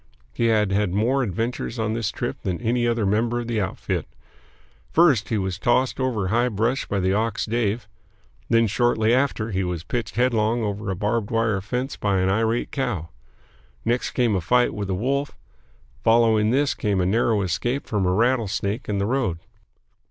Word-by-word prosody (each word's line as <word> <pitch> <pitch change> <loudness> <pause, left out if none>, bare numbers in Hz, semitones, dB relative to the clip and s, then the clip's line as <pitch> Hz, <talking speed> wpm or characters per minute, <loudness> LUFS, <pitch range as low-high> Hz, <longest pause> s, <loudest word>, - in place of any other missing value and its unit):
He 115 - +1
had 105 -3 +2
had 100 -2 +1
more 125 +6 +2
adventures 115 +3 -3
on 110 -1 -1
this 115 -3 -1
trip - - -4
than 90 -2 -2
any 120 +1 0
other 115 -2 +1
member 115 +4 +1
of - - -6
the 115 -3 0
outfit. 95 - -3 0.8
First 140 -12 +3
he 110 - 0
was 95 -2 -2
tossed 125 +4 +1
over 125 -7 0
a - - -2
high 120 +4 +2
brush 115 +5 -1
by 100 - -1
the 95 0 +1
ox 110 +1 0
Dave; 110 -1 -1 0.6
then, 115 0 +4
shortly 115 +1 +2
after, 125 -4 0
he 95 0 0
was 90 -2 -3
pitched 115 +8 -4
headlong 115 -1 +1
over 105 -1 -3
a 95 - -1
barbed 105 +2 -1
wire 115 -3 +1
fence 125 +7 -3
by 100 -2 0
an 95 0 +2
irate 115 +3 0
cow. 115 - -2 0.8
Next 120 +2 0
came 120 -5 +2
a 95 - 0
fight 125 +8 +2
with 100 -2 -4
a 95 - 0
wolf; 140 +7 -1 0.7
following 115 -2 +4
this, 140 +3 +2
came 100 -3 -1
a 90 - +1
narrow 110 +1 +2
escape 120 - -1
from 100 -4 0
a - - +2
rattlesnake 110 0 0
in 105 - 0
the 100 - 0
road. 120 -7 0
110 Hz, 185 wpm, -23 LUFS, 100-120 Hz, 0.8 s, then